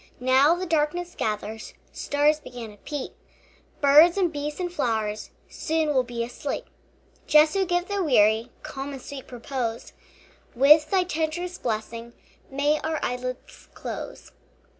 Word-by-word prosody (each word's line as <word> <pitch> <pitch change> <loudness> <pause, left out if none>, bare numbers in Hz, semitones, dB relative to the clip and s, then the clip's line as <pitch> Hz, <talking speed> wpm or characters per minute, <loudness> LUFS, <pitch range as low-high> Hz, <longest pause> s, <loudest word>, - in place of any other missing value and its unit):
Now 260 +6 +4
the 365 +1 -4
darkness 335 +2 0
gathers, 215 +1 -4 0.2
Stars 295 +1 +1
begin 240 -6 -9
to 205 - -16
peep, 290 +5 -6 0.7
Birds 300 +6 +7
and 360 -4 +1
beasts 295 +2 -4
and 355 -1 -3
flowers 220 -8 -2 0.2
Soon 315 -1 -1
will 260 - +4
be 240 -1 -4
asleep. 245 +4 -5 0.6
Jesu, 310 +6 +5
give 350 +1 0
the 405 -2 -1
weary 220 -5 +3
Calm 280 -2 -6
and 270 - -8
sweet 275 -2 -9
repose; 240 -2 -4 0.6
With 295 +5 +6
thy 380 -2 +3
tenderest 350 +1 -3
blessing 230 +1 -4 0.4
May 290 +3 +1
our 315 -1 -2
eyelids 255 - -5
close. - - -7
285 Hz, 135 wpm, -25 LUFS, 245-320 Hz, 0.7 s, Birds